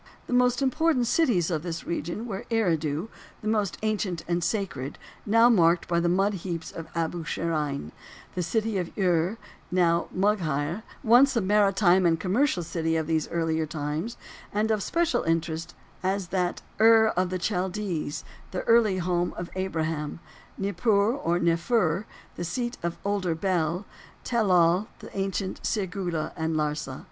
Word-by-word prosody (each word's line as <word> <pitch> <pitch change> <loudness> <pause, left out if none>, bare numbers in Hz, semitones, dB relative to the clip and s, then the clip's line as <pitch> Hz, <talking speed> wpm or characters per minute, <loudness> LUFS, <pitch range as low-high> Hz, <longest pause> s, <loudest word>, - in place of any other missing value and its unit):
The - - -4
most 250 +1 +3
important 280 +1 +2
of - - -1
the - - +1
cities 200 - +2
of 160 -3 0
this 170 0 -5
region 170 +6 -3
were 200 -4 -5
Eridu, 165 -5 0 0.3
the - - -3
most 210 -7 0
ancient 205 -6 -1
and 175 0 0
sacred, 165 - -2 0.3
now 230 +3 +6
marked 175 -7 +4
by 170 -1 +2
the 170 0 +1
mud 195 +4 +2
heaps 170 -3 -4
of 165 - -7
Abu 165 0 -1
Sharein; 150 - -2 0.4
the 180 - -2
city 215 +4 0
of 175 -2 -3
Ur, 180 +1 +2 0.3
now 170 -1 +2
Mugheir, 175 -4 0 0.2
once 250 +5 +6
a - - +4
maritime 190 -2 +4
and 165 -1 +2
commercial 190 - +1
city 165 0 -1
of 160 -1 0
these 160 -1 0
earlier 160 -2 0
times, 155 +8 -3 0.3
and 215 +2 +1
of 215 -2 +1
special 340 - +1
interest 165 +1 -2 0.3
as 190 -1 -1
that 180 -1 -1 0.2
"Ur 220 0 +7
of 180 0 +1
the 185 - -1
Chaldees," 180 -4 -2 0.3
the 185 - -3
early 230 -4 +4
home 175 0 0
of 170 0 -5
Abraham; 160 -5 -2 0.4
Nippur, 200 +3 +2
or 175 -11 0
Neffur, 170 +2 +1 0.3
the 175 - -3
seat 240 +7 -2
of 170 0 -3
older 195 -5 0
Bel; 175 +1 0 0.4
Tel 235 -3 +1
Loh, 180 +1 +4
the - - -12
ancient 195 -1 -2
Sirgulla, 180 -6 -2
and 160 0 -1
Larsa. 150 -3 -2
180 Hz, 155 wpm, -27 LUFS, 165-210 Hz, 0.4 s, Ur